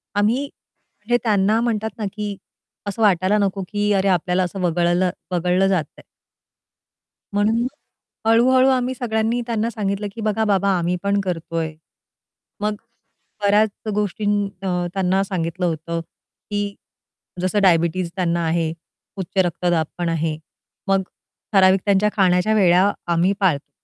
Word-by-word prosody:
आम्ही 215 +7 +2
म्हणजे 240 -4 -5
त्यांना 210 0 +2
म्हणतात 220 -2 -1
ना, 215 - -3
की 210 -1 -4 0.5
असं 200 +3 -4
वाटायला 195 0 +3
नको 195 -1 0
की, 205 0 0
"अरे, 195 0 +2
आपल्याला 180 0 +2
असं 180 +2 -4
वगळलं 175 +1 +2 0.2
वगळलं 180 +2 +2
जातंय." 180 -7 -2 1.3
म्हणून 215 +3 +2
मग 245 - 0 0.6
हळू-हळू 255 +3 +5
आम्ही 255 -1 +1
सगळ्यांनी 225 0 -1
त्यांना 230 -1 0
सांगितलं 205 -2 -2
की, 230 - -6
"बघा 215 0 0
बाबा, 200 -1 +2
आम्ही 175 +1 0
पण 200 0 +1
करतोय." 165 -3 -3 0.9
मग 210 0 0 0.7
बऱ्याच 210 +2 +4 0.3
गोष्टी 210 0 -2 0.4
अ, - - -2 0.3
त्यांना 190 0 +1
सांगितलं 180 -2 -2
होतं 165 0 -2
की 205 +4 -7 0.7
जसं 185 +3 +1
डायबिटीज 170 -1 +2
त्यांना 170 -2 0
आहे, 160 -1 0 0.4
उच्च 190 0 -6
रक्तदाबपण 175 0 -1
आहे. 160 -1 -1 0.5
मग 195 0 +2 0.5
ठराविक 190 -1 +5
त्यांच्या 200 0 +3
खाण्याच्या 185 +1 +3
वेळा 190 0 +4 0.2
आम्ही 180 +4 +2
पाळतो. 165 -8 +1
195 Hz, 130 wpm, -21 LUFS, 175-210 Hz, 1.3 s, हळू-हळू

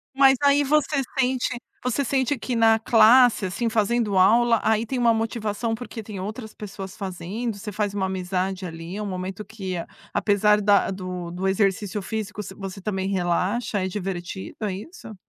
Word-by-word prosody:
Mas 270 -1 +6
aí 285 0 +5
você 285 0 +2 0.2
sente 255 -1 +1 0.3
você 250 +3 0
sente 265 +1 0
que 250 +2 -4
na 225 -1 +5
classe, 230 0 +6
assim, 210 +6 -1
fazendo 220 -1 +1
aula, 230 +4 +5
aí 220 +1 +2
tem 260 +3 -3
uma 235 -1 +4
motivação 225 0 -2
porque 230 -1 -7
tem 205 -2 -7
outras 215 +3 -6
pessoas 195 -2 -8
fazendo, 200 +4 -4
você 210 +1 -6
faz 205 0 -1
uma 195 -2 -1
amizade 185 0 -2
ali, 165 +3 -6
um 210 - -3
momento 190 +2 -5
que 195 -4 -5 0.4
apesar 210 0 +3
da 205 -1 +3
do 180 -2 -5
do 180 +2 -2
exercício 195 +1 0
físico, 210 0 -4
você 190 - -8
você 195 0 -7
também 190 -1 -2
relaxa. 195 +4 0
É - - 0
divertido, 190 -1 -5
é 205 -3 -1
isso? 220 - -9
210 Hz, 170 wpm, -24 LUFS, 190-230 Hz, 0.4 s, Mas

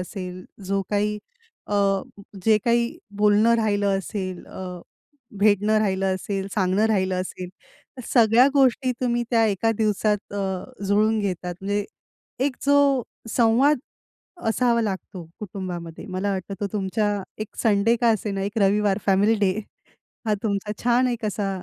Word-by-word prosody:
असेल, 185 -1 -6 0.2
जो 195 +1 0
काही 210 0 0 0.5
अ, - - 0 0.7
जे 220 -1 +5
काही 235 0 +1 0.2
बोलणं 210 +2 +4
राहिलं 205 -3 +1
असेल, 185 -1 -5
अ, 180 -2 -7 0.6
भेटणं 210 +1 +3
राहिलं 195 -2 +1
असेल, 195 +1 -3
सांगणं 195 +1 +2
राहिलं 190 -4 +1
असेल, 185 0 -6 0.5
तर 255 - -7
सगळ्या 235 +1 +5
गोष्टी 260 -1 +3
तुम्ही 240 -1 +1
त्या 230 -2 +4
एका 210 +2 +1
दिवसात 210 -1 0
अ, 195 +4 -4
जुळवून 215 +2 +3
घेता. 180 -3 -3
म्हणजे 205 +1 -1 0.6
एक 265 -1 0
जो 280 -2 +4 0.3
संवाद 245 +6 +4 0.7
असावा 235 0 +2
लागतो 190 -3 -4 0.2
कुटुंबामध्ये 180 -4 -6
मला 190 +1 -2
वाटतं 190 +1 -4
तो 205 - 0
तुमचा 205 0 -1 0.2
1 215 -1 -4
संडे 215 +1 +3
का 240 - +4
असेना, 205 -2 -1
1 205 +3 -3
रविवार 200 0 +2
फॅमिली 200 +3 +4
डे 195 -2 +3 0.7
हा 215 - +2
तुमचा 210 -1 -1
छान 245 +1 +3
एक 235 -2 -3
असा 205 0 -2
205 Hz, 140 wpm, -24 LUFS, 195-225 Hz, 0.7 s, जे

